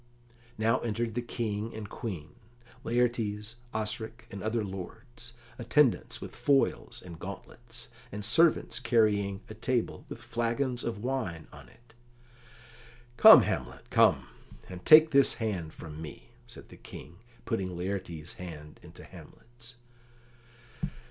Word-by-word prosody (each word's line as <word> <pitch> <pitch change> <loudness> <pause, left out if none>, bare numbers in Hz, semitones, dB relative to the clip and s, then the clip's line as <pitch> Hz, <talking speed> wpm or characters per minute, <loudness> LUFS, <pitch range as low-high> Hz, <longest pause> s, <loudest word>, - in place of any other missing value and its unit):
Now 115 +3 +2
entered 115 0 -2
the 120 - -1
King 115 -2 -3
and 110 -1 -6
Queen, 90 -8 -6 0.5
Laertes, 115 -2 -1
Osric, 110 +2 -4
and 100 - -7
other 110 +1 -1
lords; 115 +6 -9 0.3
attendants 120 +2 +2
with - - -9
foils 140 -2 +1
and 85 -2 -10
gauntlets; 115 +5 -9 0.2
and 105 0 -6
servants 115 -2 +3
carrying 105 -5 +2
a - - -8
table 125 -3 -2
with - - -6
flagons 120 +2 -2
of 115 -2 -4
wine 110 -12 -3
on - - -13
it. 120 -1 -23 1.2
"Come, - - +10
Hamlet, - - -4
come, - - +4 0.4
and 90 -1 -9
take 160 +1 +8
this 140 0 +4
hand 100 -9 -3
from 80 -1 -9
me," 70 -6 -10 0.2
said - - -11
the - - -13
King, 85 +3 -11 0.3
putting 95 -6 -2
Laertes's 90 -4 -4
hand 75 -4 -9
into - - -13
Hamlet's. 120 0 -14
110 Hz, 125 wpm, -29 LUFS, 95-120 Hz, 1.2 s, Come